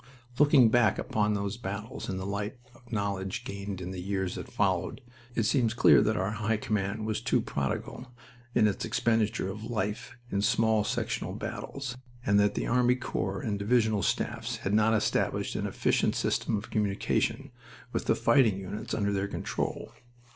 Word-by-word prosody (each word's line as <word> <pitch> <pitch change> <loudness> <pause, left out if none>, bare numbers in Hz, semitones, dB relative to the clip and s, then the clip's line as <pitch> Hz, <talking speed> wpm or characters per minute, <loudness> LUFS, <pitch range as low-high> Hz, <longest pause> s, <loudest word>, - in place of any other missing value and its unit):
Looking 145 -5 +6
back 110 -3 +4
upon 105 -1 0
those 100 +2 -2
battles 105 0 -5
in 95 - -2
the 95 - -4
light 100 +5 -3 0.2
of 120 0 -20
knowledge 100 -3 -2
gained 100 -1 -5
in 90 +1 -5
the 90 -1 -5
years 95 -1 -2
that - - -7
followed, 95 0 0 0.4
it 115 - +2
seems 115 0 +2
clear - - +7
that 110 0 +1
our 95 +1 0
High 105 +1 0
Command 105 0 -2
was 110 -1 -1
too - - +2
prodigal 125 - -3 0.5
in 110 -3 +5
its 100 - -2
expenditure 115 -4 +1
of 105 +2 -8
life 105 -1 -3
in 100 - +1
small 110 0 +3
sectional - - -2
battles, 135 -3 -5 0.3
and 100 -1 +4
that 105 0 +3
the - - -1
army 125 0 +3
corps 100 -6 -3
and 105 -3 -2
divisional 110 -1 +2
staffs - - -1
had 100 - 0
not 110 +1 +4
established 105 - 0
an - - -1
efficient - - +1
system 110 - 0
of 105 - -7
communication 105 -3 0 0.4
with - - -1
the - - +3
fighting 115 -9 +4
units 95 +2 -5
under 100 -1 0
their 100 0 0
control. - - -3
105 Hz, 170 wpm, -29 LUFS, 100-115 Hz, 0.5 s, clear